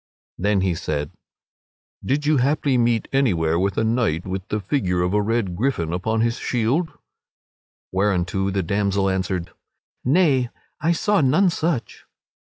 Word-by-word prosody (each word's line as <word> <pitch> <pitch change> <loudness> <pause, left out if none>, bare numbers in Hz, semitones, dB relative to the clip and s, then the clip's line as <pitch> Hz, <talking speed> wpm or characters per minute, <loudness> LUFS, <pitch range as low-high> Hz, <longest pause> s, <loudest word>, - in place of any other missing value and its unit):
Then 100 +1 +2
he 95 -2 +1
said: 75 -2 -3 0.9
"Did 145 +3 0
you 150 0 +3
haply 140 +1 +1
meet 120 -2 +2
anywhere 85 -12 +2
with 95 +1 0
a - - +2
knight 110 -8 0
with 95 +1 -4
the 105 - -2
figure 95 -5 0
of 90 +2 -1
a 105 - +3
red 105 -4 -1
gryphon 85 -8 -1
upon 110 +5 0
his 115 +1 +1
shield?" 130 +8 0 1.0
whereunto 95 0 0
the 95 -1 -1
damsel 100 +1 +1
answered: 95 -2 -2 0.5
"Nay, 135 -4 +3 0.3
I 160 +3 +1
saw 205 +2 +2
none 155 +8 +3
such." 160 -6 -2
105 Hz, 145 wpm, -22 LUFS, 95-135 Hz, 1.0 s, you